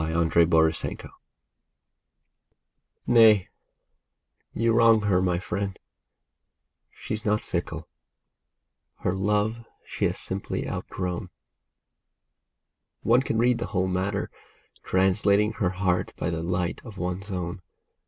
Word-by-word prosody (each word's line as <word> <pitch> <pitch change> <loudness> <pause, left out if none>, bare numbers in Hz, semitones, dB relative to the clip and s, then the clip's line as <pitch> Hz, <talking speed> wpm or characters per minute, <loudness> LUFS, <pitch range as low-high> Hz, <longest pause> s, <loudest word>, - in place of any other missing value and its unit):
OUTGROWN 80 0 +1 1.9
Nay, 110 -5 +5 1.0
you 115 0 +1
wrong 115 -1 +5
her, 100 -3 +2
my 90 -2 +1
friend, 100 0 -4 1.1
she's 110 0 -5
not 105 -2 0
fickle; 80 -2 -4 1.1
her 90 - 0
love 105 +4 0 0.2
she - - -2
has - - 0
simply - - -2
outgrown; 90 -1 -4 1.7
One 120 +3 +4
can 115 - -2
read 120 +1 +3
the 115 - -3
whole 95 +1 +2
matter, 95 +2 -2 0.5
translating 100 +3 +2
her 95 - +2
heart 90 -1 -1
by - - -2
the 80 -1 -3
light 90 +1 -2
of 110 -5 -11
one's 90 +3 -4
own. 90 0 -4
95 Hz, 105 wpm, -26 LUFS, 90-105 Hz, 1.9 s, Nay